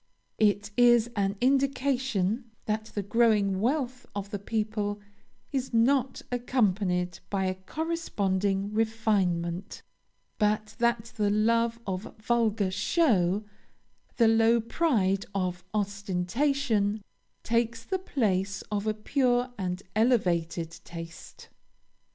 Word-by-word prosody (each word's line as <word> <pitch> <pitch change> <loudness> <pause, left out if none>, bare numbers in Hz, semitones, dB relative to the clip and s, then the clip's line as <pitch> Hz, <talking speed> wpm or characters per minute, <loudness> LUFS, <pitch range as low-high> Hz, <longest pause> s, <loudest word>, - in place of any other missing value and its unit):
It 205 0 +2
is 240 -1 +5
an 200 -1 0
indication 260 -5 +1 0.2
that 215 0 -1
the 205 -2 -4
growing 205 -3 +2
wealth 255 0 -1
of 200 0 -5
the 205 - -3
people 210 0 -2 0.5
is 265 -3 -2
not 260 +3 +2
accompanied 195 -8 0
by 195 -1 0
a 185 - 0
corresponding 200 - -1
refinement; 200 -5 0 0.6
but 215 0 0
that 235 -1 0
the 210 -1 +2
love 230 +2 +2
of 190 +2 -5
vulgar 220 -3 +1
show, 205 - +2 0.7
the 230 - +5
low 225 +1 +4
pride 220 - +1
of 180 -2 -2
ostentation, 205 +3 0 0.4
takes 230 0 0
the 380 +9 -2
place 200 - -1
of 210 0 -1
a 215 - +1
pure 245 +2 +1
and 185 -2 -3
elevated 175 -8 +1
taste. 165 -1 -10
215 Hz, 105 wpm, -28 LUFS, 195-240 Hz, 0.7 s, is